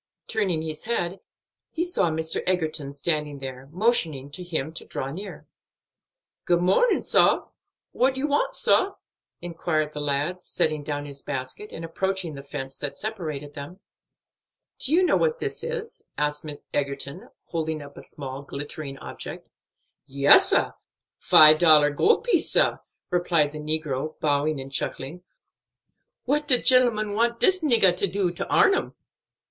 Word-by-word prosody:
Turning 190 -8 -1
his 155 +2 -6
head, 190 -5 -2 0.5
he 330 - -2
saw 270 - 0
Mr. 160 0 -2
Egerton 155 -6 -1
standing 150 0 -2
there, 135 0 -8
motioning 165 - +1
to 180 +5 -7
him 160 -3 -3
to - - -4
draw 135 +1 -5
near. 195 +7 -8 1.0
"Good 175 -1 +2
mornin', 195 - +2
sah. - - +3 0.4
What 265 +1 +1
you 265 - -1
want, 290 0 0
sah?" 390 +1 +3 0.5
inquired 160 -3 -2
the 150 - -5
lad, 145 +5 -2
setting 155 -3 -1
down 145 0 -4
his 140 -1 -8
basket, 135 +9 -5
and 165 - -7
approaching 190 0 -2
the 140 - -8
fence 135 -1 -7
that 145 - -5
separated 155 -10 -5
them. 145 +7 -9 1.0
"Do 265 - +2
you 350 +4 +4
know 360 - +3
what 475 -1 +1
this - - -4
is?" 475 -1 -5 0.2
asked 150 +1 -2 0.3
Egerton, 140 0 -3 0.2
holding 160 -2 -3
up 140 0 -13
a - - -10
small 135 -1 -7
glittering 140 0 -6
object. - - -9 0.6
"Yes, 140 +1 +6
sah; - - +2 0.5
five 155 0 +7
dollar 155 -3 +6
gold 435 - +2
piece, 430 -10 +2
sah," - - +3 0.3
replied 170 -4 +1
the 155 - -8
negro, 155 -1 -3
bowing 145 0 0
and 135 0 -8
chuckling. 140 +5 -4 1.0
"What 295 +3 0
de 250 -3 +6
gentleman 235 -5 +4
want 235 +2 0
dis 375 -1 +4
niggah 225 - +4 0.2
do 195 -2 0
for 175 - -9
to - - -3
arn 390 - +5
'em?" - - -2
160 Hz, 150 wpm, -24 LUFS, 145-205 Hz, 1.0 s, five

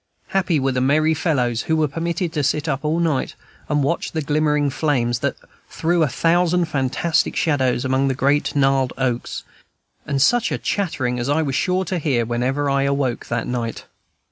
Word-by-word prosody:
Happy 180 -5 +1
were 135 0 +1
the 125 0 -1
merry 155 +4 +3
fellows 125 -8 0
who 160 - +3
were 155 -1 +2
permitted 170 +3 -3
to 150 - 0
sit 150 +3 0
up 135 -1 -2
all 155 +2 0
night, 160 -6 0 0.3
and 145 -1 +1
watch 170 +5 -1
the 160 - -1
glimmering 150 -1 +1
flames 125 -6 0
that - - -1 0.3
threw 170 +1 0
a 155 - +4
thousand 175 +5 +2
fantastic 155 +2 0
shadows 130 -5 +1
among 130 +1 +1
the 135 - 0
great 145 +3 +1
gnarled 135 -2 +2
oaks. 125 -3 -2 0.6
And 140 -2 0
such 235 - +3
a - - 0
chattering 130 -11 -2
as 120 +3 -2
I 155 +2 +2
was 140 -3 -2
sure 185 +6 0
to 180 +1 -2
hear 130 -7 0
whenever 125 +5 -1
I 140 0 +2
awoke 140 -3 -1
that 115 -1 -2
night! 120 -2 -4
145 Hz, 185 wpm, -21 LUFS, 130-160 Hz, 0.6 s, a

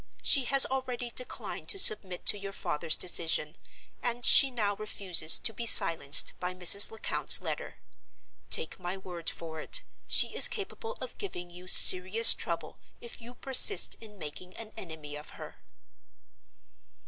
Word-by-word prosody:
She 270 -3 0
has 275 +2 +6
already 250 -2 -8
declined 250 +2 -8
to 395 - -3
submit 190 - +1
to - - +1
your 195 0 -10
father's 170 -4 -3
decision, 165 -3 -2 0.5
and 240 0 -3
she 275 - +4
now 210 -5 -5
refuses 185 -6 +1
to 225 - -4
be 235 +2 -7
silenced 160 -8 +4
by 180 0 -8
Mrs. 185 +3 +5
Lecount's 225 - 0
letter. - - -9 0.7
Take - - 0
my 180 +1 -8
word 175 -3 -7
for 160 -1 -11
it, - - -3 0.2
she - - +2
is - - +7
capable 455 0 -9
of - - -12
giving 175 - -9
you 180 +1 -16
serious 185 +5 +5
trouble 165 -3 -9 0.2
if 235 - -14
you 240 +2 -15
persist 270 - +3
in 210 -2 -15
making 180 +3 -11
an 220 -1 -12
enemy 155 -4 -12
of 150 +1 -14
her." - - -14
195 Hz, 150 wpm, -26 LUFS, 170-240 Hz, 0.7 s, is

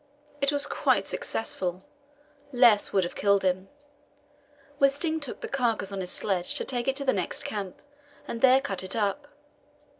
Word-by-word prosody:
It 280 0 +3
was 285 0 +2
quite - - +1
successful; 190 - -3 0.7
less 240 -5 +5
would 195 - +2
have 175 - -4
killed 200 -1 +2
him. 185 +1 0 1.1
Wisting 285 +4 +2
took 290 -4 -7
the - - -4
carcass 230 -7 -1
on 195 -1 -4
his 180 - -4
sledge 185 -3 0
to - - +1
take 245 -2 -2
it 270 - +1
to 280 0 -2
the 260 - +3
next 185 -3 -1
camp, 200 -3 -5 0.5
and 230 - -5
there 265 0 +6
cut 195 -9 -4
it 190 +2 -3
up. 225 +7 -1
225 Hz, 170 wpm, -27 LUFS, 190-275 Hz, 1.1 s, there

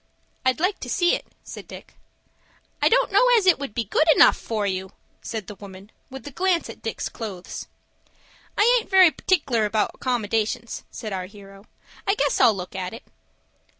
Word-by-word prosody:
"I'd 260 +2 +1
like 370 +4 0
to - - -7
see 350 -4 +2
it," - - -3 0.2
said - - -10
Dick. - - -12 0.9
"I - - +5
don't - - +2
know - - +4
as 420 - +1
it 365 -5 +5
would 275 -7 -6
be 235 - 0
good 265 - +1
enough - - +7
for 215 -3 -3
you," 190 -1 -3 0.3
said 220 -3 -5
the 210 - -8
woman, 195 +1 -12 0.2
with 265 +1 -10
a 290 - -7
glance 360 +3 0
at - - -15
Dick's - - -4
clothes. 195 -6 -7 0.9
"I 475 +4 +5
aint 450 - -10
very 375 -4 +7
partic'lar 275 - 0
about 210 0 0
accommodations," 225 -2 -2
said 215 -4 -7
our 185 -1 -4
hero. 195 0 -15 0.4
"I 395 - +3
guess 290 -7 +1
I'll 235 -5 +6
look 185 +1 -7
at 185 +2 -4
it." 230 - -12
230 Hz, 185 wpm, -23 LUFS, -, 0.9 s, enough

